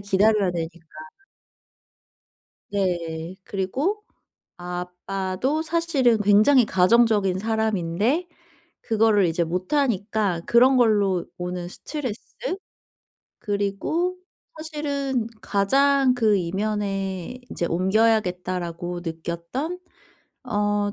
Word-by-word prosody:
기다려야 205 0 +3
되니까 165 0 -4 1.9
네. 175 -3 -2
그리고 270 - -2 0.5
아빠도 185 - -3
사실은 315 -8 +2
굉장히 215 +6 +5
가정적인 200 -1 +3
사람인데 220 - 0 0.6
그거를 220 -3 +3
이제 170 +1 0
못하니까 200 - 0
그런 255 +3 +5
걸로 205 -7 +3
오는 180 0 -4
스트레스? 250 - -5 1.2
그리고 205 - -1 0.4
사실은 285 -6 -2
가장 270 +7 +3
그 220 -4 +3
이면에 195 +2 -2
이제 170 - -2
'옮겨야겠다.'라고 180 -3 0
느꼈던 170 - -4 0.7
어 205 -1 0
205 Hz, 205 characters per minute, -24 LUFS, 180-245 Hz, 1.9 s, 굉장히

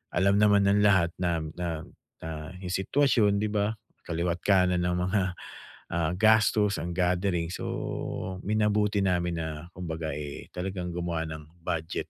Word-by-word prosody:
alam 100 +3 +4
naman 105 -1 +5
ng 100 +1 +4
lahat 95 -5 +4
na 85 -3 0 0.2
na 85 -2 -3 0.4
na 80 - -4 0.3
yung 90 - -4
sitwasyon, 105 -1 +3
'di 105 - 0
ba? 105 +1 0 0.3
Kaliwat-kanan 90 +2 +2
ang 90 0 +1
mga, 95 +3 +1 0.7
ah, 85 -1 0
gastos, 105 -1 +4
ang 85 +1 -4
gathering 90 -1 +1
so 95 0 -4
minabuti 105 -1 +2
namin 90 -3 +1
na 80 +1 -5
kumbaga 80 -3 -4
eh, 75 -1 -6
talagang 90 -1 -4
gumawa 85 -2 -2
ng 80 +2 -10
budget 80 -1 -3
90 Hz, 140 wpm, -28 LUFS, 85-100 Hz, 0.7 s, naman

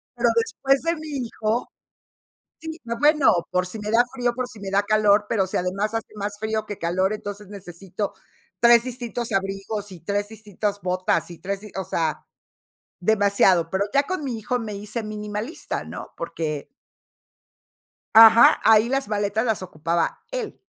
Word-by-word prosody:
pero - - +2
después 275 -12 +1
de 335 +1 +1
mi 310 0 -8 0.2
hijo 225 +2 -2 0.9
sí, 320 +1 -7 0.2
bueno, 300 0 +5 0.2
por 180 0 +1
si 215 +4 -7
me 210 0 -4
da 235 +2 +5
frío, 245 -2 0
por 255 0 -2
si 230 - -13
me 195 -1 -5
da 200 +1 +2
calor, 210 -1 +3
pero 195 -4 +1
si - - -4
además 195 +4 -1
hace 225 -1 -4
más 205 0 -5
frío 220 0 -2
que 205 -2 -7
calor, 185 +4 0
entonces 205 -1 -6
necesito 195 0 -6 0.5
3 235 0 +6
distintos 240 -2 -4
abrigos 195 +2 -2
y 175 - -11
3 205 +4 -2
distintas 210 -1 -4
botas 185 -1 0
y 170 - -10
3 195 +1 -3
dis 210 -1 -11
o 190 - -2
sea, 160 -3 -2 0.8
demasiado, 200 -4 +3
pero 190 +2 0
ya 280 - +4
con 370 +1 -4
mi 245 -4 -3
hijo 245 +3 -2
me 215 -3 -5
hice 210 +3 -4
minimalista, 210 +5 -5
¿no? - - -8
Porque 155 -3 -4 1.5
ajá, 225 +1 +9
ahí 225 +1 +5
las 270 -3 0
maletas 210 +1 0
las 220 -5 0
ocupaba 165 -1 -2
él - - -4
210 Hz, 165 wpm, -23 LUFS, 195-230 Hz, 1.5 s, ajá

